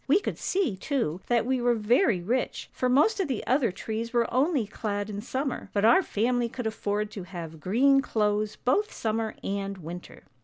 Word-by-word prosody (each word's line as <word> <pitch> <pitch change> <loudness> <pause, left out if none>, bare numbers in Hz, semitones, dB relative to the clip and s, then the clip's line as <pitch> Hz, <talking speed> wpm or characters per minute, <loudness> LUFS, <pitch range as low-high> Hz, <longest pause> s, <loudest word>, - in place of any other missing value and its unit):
We 305 +8 +5
could - - -4
see, 365 - 0
too, 190 - -2
that 235 -2 +2
we 260 0 0
were 240 0 +3
very 225 - +2
rich, 245 +7 -2
for 255 - 0
most 300 - +4
of 380 - +1
the 260 -6 -3
other 255 -4 +2
trees 225 +4 -4
were 235 -1 +1
only 270 -1 +2
clad 205 0 -3
in 205 0 -4
summer, 260 +3 -3
but 205 0 +2
our 360 +12 +7
family 240 - 0
could 245 0 -6
afford 210 -1 -2
to 205 - -6
have 170 -3 -8
green 265 - +4
clothes 210 -3 0
both 405 +13 +1
summer 220 0 -2
and 195 0 -3
winter. 175 +1 -9
230 Hz, 190 wpm, -27 LUFS, 205-260 Hz, -, our